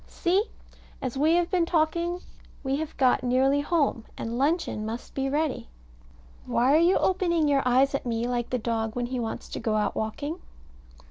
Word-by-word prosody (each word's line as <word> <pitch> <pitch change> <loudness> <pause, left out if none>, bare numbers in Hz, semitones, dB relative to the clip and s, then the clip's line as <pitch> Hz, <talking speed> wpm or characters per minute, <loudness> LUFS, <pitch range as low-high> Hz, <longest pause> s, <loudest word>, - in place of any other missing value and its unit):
See! 380 +4 +1 0.5
As 255 -1 -4
we 305 +4 +3
have 350 +1 +1
been 350 -3 +2
talking 340 +2 0 0.4
we 270 0 0
have 310 0 -5
got 260 -2 +3
nearly 265 +3 +3
home: 290 -6 0
and 230 +1 -4
luncheon 285 -4 0
must 225 +2 -6
be 270 0 -1
ready. 295 - -1 0.8
Why 255 +4 +3
are 310 - +6
you 345 +3 +4
opening 345 -4 +1
your 280 -1 +3
eyes 265 +3 +4
at 275 - -1
me 230 0 -1
like 240 -1 -2
the 250 - 0
dog 225 -1 -2
when 245 -1 -1
he 250 +1 -3
wants 225 -2 -4
to - - -5
go 220 -2 -1
out 210 -1 +1
walking? 285 +10 -3
275 Hz, 185 wpm, -26 LUFS, 240-325 Hz, 0.8 s, are